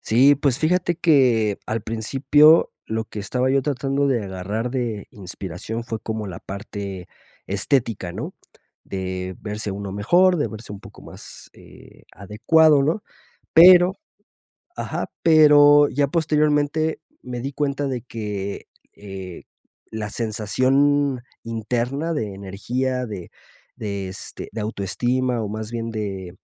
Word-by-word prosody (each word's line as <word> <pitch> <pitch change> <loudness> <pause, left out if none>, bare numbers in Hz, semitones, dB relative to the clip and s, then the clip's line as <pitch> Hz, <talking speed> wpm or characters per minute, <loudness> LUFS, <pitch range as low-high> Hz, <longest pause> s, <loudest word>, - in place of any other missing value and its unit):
Sí, 130 +6 +5
pues, 140 -2 0
fíjate 175 +2 +1
que 125 - +3
al 110 -1 -2
principio 135 +8 +4
lo 110 0 -2
que 105 - -7
estaba 125 +6 -1
yo 135 0 +2
tratando 140 0 -1
de 120 -6 0
agarrar 100 +5 -4
de 120 -5 -3
inspiración 95 +3 -7
fue 115 -2 -5
como 110 0 -4
la 90 -4 -8
parte 100 -2 -7 0.4
estética, 100 -3 -1
¿no? - - -6 0.5
De 95 -1 -5
verse 105 0 -4
uno 100 0 -5
mejor, 175 - +3
de 145 - -1
verse 110 -1 -9
un 100 - -9
poco - - -14
más, - - -12
eh, - - -17
adecuado, 140 - +3
¿no? 160 +9 0 0.5
Pero, 180 +2 +8 0.8
ajá, - - -4
pero, 145 -2 +7
ya 145 +1 +1
posteriormente 150 0 +1 0.2
me 125 -1 -6
di 135 +2 -5
cuenta 140 0 -1
de 125 -3 -3
que, 105 -4 -5 0.3
eh, 95 -3 -9 0.5
la 110 -1 -4
sensación 130 +6 +1 0.2
interna 120 +7 -2
de 110 -9 -3
energía, 125 +7 -3
de 100 -6 -8 0.4
de 100 -2 -4
este, 95 - -8
de 110 0 -5
autoestima, 120 +4 -1
o 105 - -3
más 110 +1 -5
bien 115 -1 -4
de, 95 -4 -5
115 Hz, 130 wpm, -22 LUFS, 100-145 Hz, 0.8 s, Pero